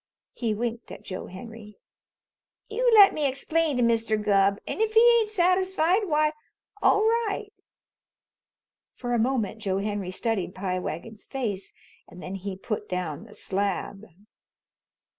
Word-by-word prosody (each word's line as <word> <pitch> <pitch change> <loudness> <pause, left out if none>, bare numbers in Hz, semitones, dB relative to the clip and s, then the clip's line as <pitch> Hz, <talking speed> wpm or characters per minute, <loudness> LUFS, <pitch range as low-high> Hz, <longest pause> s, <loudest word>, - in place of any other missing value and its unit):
He 225 -3 -1
winked 235 +1 -4
at - - -10
Joe 185 - -6
Henry. 210 +2 -11 0.9
"You 480 +3 +2
let 405 -2 +9
me 300 -2 +1
explain 295 +2 0
to 245 - +2
Mr. 225 -2 +2
Gubb, 200 -1 +3
an' - - -3
if 445 0 0
he 470 +1 +7
ain't 435 -2 -1
satisfied, 370 0 +2
why 305 -1 +2 0.5
all 415 - +4
right." 440 -2 0 1.4
For 245 -1 -3
a 240 - +2
moment 225 -3 0
Joe 195 -2 -1
Henry 205 -2 -3
studied 195 -1 -2
Pie 185 -1 -2
Wagon's 190 +6 -7
face, 215 -8 -3 0.4
and 180 - -13
then 185 - -7
he 195 0 -5
put 210 +1 -4
down 180 0 -3
the 215 - -14
slab. 200 +1 -3
230 Hz, 140 wpm, -26 LUFS, 200-330 Hz, 1.4 s, let